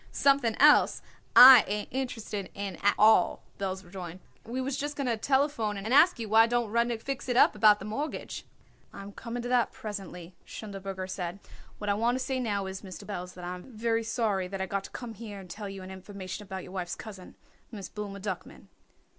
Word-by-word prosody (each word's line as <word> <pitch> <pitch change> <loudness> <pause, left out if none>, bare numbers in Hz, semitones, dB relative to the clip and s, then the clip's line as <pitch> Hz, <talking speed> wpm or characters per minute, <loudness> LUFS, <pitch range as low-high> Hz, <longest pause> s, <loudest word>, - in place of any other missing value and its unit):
"Something 275 -5 +2
else 295 +1 +5 0.3
I 255 -2 +11
ain't 210 +1 -3
interested 225 -6 -4
in 200 -1 -4
at 205 0 +2
all," 215 -4 +4 0.2
Belz 190 -1 -3
rejoined. 175 -1 -8 0.2
"We 240 +3 -5
was 260 +1 -2
just 290 +1 -3
going 280 - -2
to 240 -2 +1
telephone 265 -3 0
and 215 +5 -3
ask 325 +6 +6
you 230 -2 -5
why 225 +2 +6
don't 240 -2 -1
Rudnik 235 0 0
fix 275 -2 -4
it 245 - +1
up - - +6
about 210 0 +5
the 195 - -9
mortgage?" 280 +9 -5 0.5
"I - - -9
am 200 - -9
coming 235 +3 -6
to 245 - -4
that 245 -2 +2
presently," 190 -4 -8
Schindelberger 195 -3 -7
said. 180 -1 -4 0.4
"What 210 - -6
I - - +3
want 230 +4 +1
to - - -2
say 265 -1 -2
now 205 -5 -1
is, 190 0 -6
Mr. 195 0 -10
Belz, 180 -3 -6
that 180 - -10
I 175 +1 -4
am 180 +8 -11
very 230 0 +1
sorry 215 -5 -1
I 190 -1 -2
got 195 +1 -3
to - - -9
come 240 -2 -7
here 210 -2 -8
and 190 - -11
tell 205 +3 -7
you 195 -1 -8
an 185 - -9
information 190 +1 -8
about 190 -2 -7
your - - -11
wife's 180 -2 -4
cousin, 195 -4 -11 0.4
Miss 200 -5 -7
Blooma 205 -2 -7
Duckman." 190 -3 -7
210 Hz, 210 wpm, -29 LUFS, 190-235 Hz, 0.5 s, I